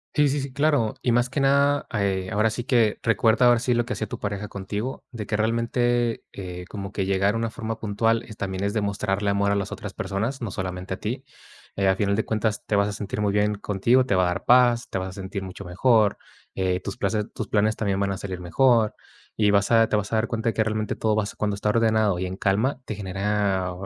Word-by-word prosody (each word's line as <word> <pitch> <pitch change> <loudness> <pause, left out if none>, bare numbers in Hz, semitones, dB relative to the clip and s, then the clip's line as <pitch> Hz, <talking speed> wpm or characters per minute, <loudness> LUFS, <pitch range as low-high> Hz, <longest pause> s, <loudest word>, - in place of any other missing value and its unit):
Sí, 150 -1 +4
sí, 145 +1 0
sí, 135 0 -5
claro. 140 -5 +1
Y 125 - +2
más 120 +1 +2
que 135 - -2
nada, 140 +1 +3
eh, 95 -3 0
ahora 105 +1 +2
sí 120 +2 -4
que 115 -4 +2
recuerda 115 +2 +3
ahora 120 -1 +6
sí 125 0 +1
lo 120 0 +1
que 125 - -3
hacía 110 - -3
tu - - -6
pareja 100 0 -3
contigo, 100 +6 -5
de 110 -5 -6
que 105 - -1
realmente, 115 +1 0
eh, 90 -2 -7
como 100 -2 -6
que 100 -2 -2
llegar 100 +2 +1
a - - 0
una 115 0 -2
forma 110 0 -4
puntual 115 +2 +1
es 110 - -11
también 95 -2 -4
es 100 0 0
demostrarle 100 -1 -1
amor 100 0 +2
a - - +2
las 100 -1 -2
otras - - -6
personas, 110 +8 -3
no 115 - -3
solamente 95 0 -4
a - - -14
ti, 120 +7 -4 0.5
eh. 100 -1 +1
Al 95 - +4
final 100 0 +1
de 110 - -1
cuentas, 110 -1 -1
te 105 - 0
vas 100 0 +3
a - - -3
sentir 105 0 -4
muy 105 -1 +1
bien 105 +1 +2
contigo, 105 +6 +2
te 125 - +1
va 95 - +3
a - - +3
dar 90 +2 -3
paz, 120 -1 +4
te - - -3
vas 95 0 -3
a - - -10
sentir 95 +1 -5
mucho 95 +1 -8
mejor, 105 +3 +3 0.4
eh, 95 -1 0
tus 95 +3 -6
places 110 -3 -1
tus - - -5
planes 110 +1 +2
también 100 -3 -1
van 100 0 0
a 95 - -3
salir 95 -2 -5
mejor 110 +5 +3 0.4
y 105 -2 +3
vas 100 -1 +3
a 115 -1 +5
te - - +1
vas 105 -1 -1
a - - +1
dar 110 +1 +1
cuenta 115 0 -1
de - - -2
que 110 - +3
realmente 110 -1 -2
todo 110 -1 0
vas 105 -1 -2
cuando 105 -1 -1
está 100 +1 -1
ordenado 110 -3 +2
y 95 - -2
en 90 0 -4
calma 110 +8 0
te 110 - -4
genera, 100 -1 -1
105 Hz, 250 wpm, -24 LUFS, 100-115 Hz, 0.5 s, ahora